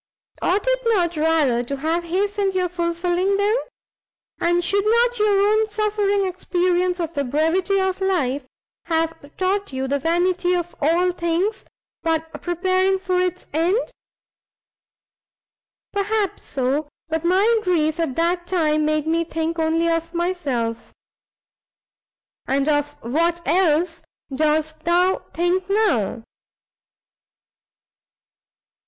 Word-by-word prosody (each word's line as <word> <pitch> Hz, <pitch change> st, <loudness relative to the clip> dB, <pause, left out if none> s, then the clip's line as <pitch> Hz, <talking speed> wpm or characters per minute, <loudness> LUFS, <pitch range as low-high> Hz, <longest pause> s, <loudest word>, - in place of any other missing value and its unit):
ought 395 Hz, +5 st, +1 dB
it -, -, +2 dB
not 360 Hz, -7 st, +2 dB
rather 305 Hz, -6 st, +2 dB
to 275 Hz, +3 st, -4 dB
have 325 Hz, +4 st, -1 dB
hastened 395 Hz, +2 st, 0 dB
your 365 Hz, -1 st, +1 dB
fulfilling 350 Hz, +2 st, 0 dB
them? 410 Hz, +2 st, +2 dB, 0.8 s
and 345 Hz, +1 st, +2 dB
should 400 Hz, +3 st, +2 dB
not 470 Hz, +2 st, +2 dB
your 405 Hz, -1 st, +3 dB
own 435 Hz, 0 st, +2 dB
suffering 415 Hz, -2 st, 0 dB
experience 360 Hz, 0 st, 0 dB
of 335 Hz, -1 st, -3 dB
the 285 Hz, -, -1 dB
brevity 325 Hz, +8 st, +1 dB
of 380 Hz, 0 st, -1 dB
life, 290 Hz, -8 st, 0 dB, 0.4 s
have 325 Hz, -3 st, -2 dB
taught 390 Hz, 0 st, 0 dB
you 265 Hz, 0 st, -3 dB
the 280 Hz, +1 st, 0 dB
vanity 355 Hz, +3 st, +1 dB
of 350 Hz, -1 st, -3 dB
all 340 Hz, +5 st, +3 dB
things 345 Hz, +4 st, -1 dB, 0.4 s
but 325 Hz, 0 st, -2 dB
preparing 370 Hz, +2 st, +1 dB
for 370 Hz, -1 st, -1 dB
its 365 Hz, 0 st, -2 dB
end?" 335 Hz, +6 st, +2 dB, 2.2 s
"Perhaps 405 Hz, 0 st, -1 dB
so, 275 Hz, +3 st, -1 dB, 0.2 s
but 320 Hz, 0 st, -2 dB
my 400 Hz, +6 st, +3 dB
grief 330 Hz, -4 st, +1 dB
at 315 Hz, -6 st, -1 dB
that 345 Hz, +1 st, 0 dB
time 310 Hz, -4 st, +1 dB
made 305 Hz, 0 st, 0 dB
me 330 Hz, +1 st, +1 dB
think 325 Hz, 0 st, -3 dB
only 325 Hz, +1 st, +1 dB
of 330 Hz, 0 st, -1 dB
myself." 280 Hz, -11 st, -2 dB, 1.6 s
"And 275 Hz, +2 st, +1 dB
of 290 Hz, -1 st, +1 dB
what 330 Hz, +8 st, +1 dB
else 340 Hz, -1 st, +2 dB, 0.3 s
dost 310 Hz, +1 st, 0 dB
thou 355 Hz, +3 st, +2 dB
think 360 Hz, +2 st, 0 dB
now?" 330 Hz, -, +1 dB
345 Hz, 120 wpm, -22 LUFS, 315-380 Hz, 2.2 s, your